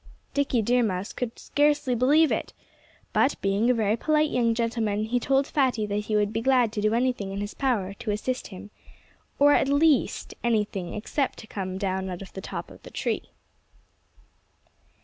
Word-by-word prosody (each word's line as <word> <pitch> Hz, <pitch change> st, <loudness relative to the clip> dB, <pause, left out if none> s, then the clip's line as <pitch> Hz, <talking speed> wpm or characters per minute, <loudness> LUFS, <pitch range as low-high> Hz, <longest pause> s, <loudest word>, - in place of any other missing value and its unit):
Dickie 270 Hz, -5 st, +1 dB
Deer 245 Hz, +3 st, +3 dB
Mouse 195 Hz, -3 st, -2 dB
could 240 Hz, -2 st, -4 dB
scarcely 290 Hz, -3 st, +1 dB
believe 285 Hz, +6 st, +4 dB
it. -, -, -2 dB, 0.6 s
But 275 Hz, -, +2 dB
being 200 Hz, +4 st, +1 dB
a -, -, +5 dB
very 215 Hz, -1 st, +1 dB
polite 305 Hz, +4 st, +1 dB
young 230 Hz, -2 st, +2 dB
gentleman, 225 Hz, -3 st, -1 dB
he 240 Hz, +3 st, 0 dB
told 270 Hz, +2 st, +2 dB
Fatty 260 Hz, -7 st, +1 dB
that 205 Hz, 0 st, -2 dB
he 215 Hz, -, -1 dB
would 210 Hz, 0 st, +1 dB
be 225 Hz, -, -1 dB
glad 250 Hz, -3 st, +3 dB
to 210 Hz, -, -2 dB
do 215 Hz, +2 st, +2 dB
anything 240 Hz, -5 st, 0 dB
in 195 Hz, -, -4 dB
his 205 Hz, +1 st, -4 dB
power 215 Hz, -8 st, -1 dB
to 210 Hz, -, -7 dB
assist 230 Hz, +5 st, -2 dB
him 205 Hz, +1 st, -11 dB, 0.7 s
or 290 Hz, +1 st, +6 dB
at -, -, +3 dB
least, 285 Hz, -1 st, +2 dB
anything 210 Hz, -6 st, -1 dB
except 265 Hz, +6 st, -2 dB
to -, -, -10 dB
come 190 Hz, -3 st, -5 dB
down 190 Hz, -1 st, -2 dB
out 180 Hz, +1 st, -6 dB
of 190 Hz, -, -14 dB
the 190 Hz, -, -6 dB
top -, -, -6 dB
of -, -, -14 dB
the -, -, -11 dB
tree. -, -, -3 dB
225 Hz, 185 wpm, -26 LUFS, 205-260 Hz, 0.7 s, or